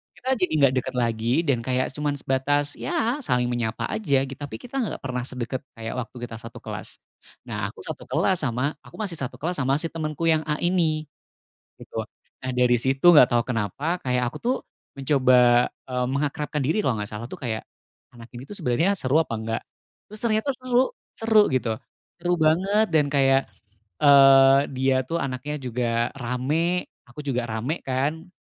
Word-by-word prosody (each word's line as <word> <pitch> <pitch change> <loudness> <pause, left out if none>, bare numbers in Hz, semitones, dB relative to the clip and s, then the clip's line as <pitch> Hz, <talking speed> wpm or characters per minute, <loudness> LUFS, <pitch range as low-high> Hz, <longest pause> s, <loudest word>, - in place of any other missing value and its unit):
Kita 260 +1 -3
jadi 185 -4 0
nggak 140 -3 +4
dekat 130 +1 -6
lagi 120 +5 +1
dan 135 -6 +1
kayak 130 +2 -1
cuman 150 0 -2
sebatas, 145 +2 0
ya, 295 -5 -1
saling 125 - 0
menyapa 115 -2 -2
aja, 145 -11 +1
tapi 135 +1 -7
kita 260 +2 -5
nggak 225 - -3
pernah 125 -1 -3
sedekat 130 0 -4 0.2
kayak 115 -1 -5
waktu 125 - -7
kita 115 -2 -6
satu 115 0 -11
kelas, - - -6 0.5
nah, - - -3
aku - - -11
satu - - -7
kelas 185 -2 +1
sama 125 +5 -1
aku - - -16
masih 195 -7 -3
satu 125 -2 -4
kelas 165 +4 -3
sama 135 0 +2
si 160 +3 -2
temenku 155 0 -4
yang 160 -1 +4
A 150 - +1
ini, 165 -3 +1 0.7
gitu. - - -8 0.4
Nah, 130 - -4
dari 125 -1 +3
situ 135 +3 -1
nggak 145 -6 +8
tau 120 -1 +2
kenapa 135 - -2
kayak 125 -3 0
aku, - - -8
tuh, 250 +2 0 0.4
mencoba, 130 -3 +4 0.2
eee, 125 -1 -2
mengakrabkan 145 +2 -2
diri, 160 +11 +1
kalau 130 - +1
nggak 105 0 -4
salah, 105 +3 -6
tuh, - - -8
kayak 110 -2 -3 0.5
anak 115 0 -13
ini, 125 +2 -9
tuh, 205 - -7
sebenernya 165 +5 +1
seru 145 -1 +2
apa 130 -8 -1
nggak? 115 +1 -3 0.5
Terus 215 +1 -9
ternyata 220 +3 +1
seru 255 0 +1 0.2
seru, 225 -1 +4
gitu, 120 -4 0 0.5
seru 175 0 +2
banget, 190 +8 +3
dan 150 -4 +2
kayak, 135 -1 +3 0.5
eee, 135 -2 +7 0.2
dia, 130 0 +2
tuh, 170 - -1
anaknya 135 +3 -4
juga 120 -3 -1
rame, 140 +8 -1 0.2
aku 145 +5 -9
juga 125 -4 -2
rame, 115 +9 -2
kan, 145 +7 -2
135 Hz, 175 wpm, -24 LUFS, 125-160 Hz, 0.7 s, nggak